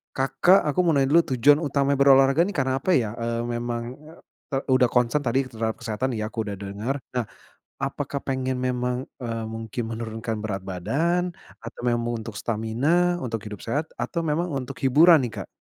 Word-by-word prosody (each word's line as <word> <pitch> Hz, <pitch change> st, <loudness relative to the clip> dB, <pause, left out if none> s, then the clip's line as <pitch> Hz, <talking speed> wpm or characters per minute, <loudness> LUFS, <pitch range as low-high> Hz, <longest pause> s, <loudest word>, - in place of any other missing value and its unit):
Kakak, 175 Hz, +8 st, +4 dB
aku 180 Hz, -, -2 dB
mau 170 Hz, -4 st, +3 dB
nanya 135 Hz, 0 st, +2 dB
dulu 170 Hz, +1 st, +7 dB
tujuan 145 Hz, +5 st, +5 dB
utama 140 Hz, -3 st, 0 dB
berolahraga 135 Hz, +5 st, +5 dB
nih 205 Hz, -, -5 dB
karena 130 Hz, -1 st, 0 dB
apa 185 Hz, -, 0 dB
ya? 110 Hz, -5 st, +1 dB
Eee, 115 Hz, 0 st, -1 dB
memang, 120 Hz, 0 st, -3 dB, 0.2 s
e 155 Hz, -2 st, -11 dB
e -, -, +2 dB
udah 130 Hz, -1 st, +5 dB
concern 125 Hz, +4 st, +2 dB
tadi 135 Hz, 0 st, +1 dB
terhadap 110 Hz, -1 st, -2 dB
kesehatan 120 Hz, +2 st, -2 dB
ya, 110 Hz, 0 st, -3 dB
aku 110 Hz, -3 st, -3 dB
udah 100 Hz, -, -3 dB
denger. 100 Hz, +7 st, -4 dB, 0.2 s
Nah, 125 Hz, -2 st, -1 dB, 0.6 s
apakah 140 Hz, 0 st, -3 dB
pengen 130 Hz, -1 st, -1 dB
memang, 125 Hz, 0 st, -1 dB, 0.2 s
eee, 115 Hz, -2 st, -4 dB
mungkin 110 Hz, +1 st, -5 dB
menurunkan 110 Hz, -1 st, -4 dB
berat 100 Hz, -3 st, -4 dB
badan? 165 Hz, -, -1 dB, 0.3 s
Atau 115 Hz, +1 st, -9 dB
memang 120 Hz, 0 st, 0 dB
untuk 115 Hz, -, -6 dB
stamina, 140 Hz, +11 st, +1 dB
untuk 115 Hz, -4 st, -4 dB
hidup 105 Hz, -2 st, -7 dB
sehat 145 Hz, +7 st, -2 dB
atau 170 Hz, -, -2 dB
memang 160 Hz, +3 st, 0 dB
untuk 135 Hz, +4 st, -5 dB
hiburan 155 Hz, +5 st, +6 dB
nih, 115 Hz, -, -9 dB
Kak? -, -, -16 dB
125 Hz, 180 wpm, -25 LUFS, 115-145 Hz, 0.6 s, dulu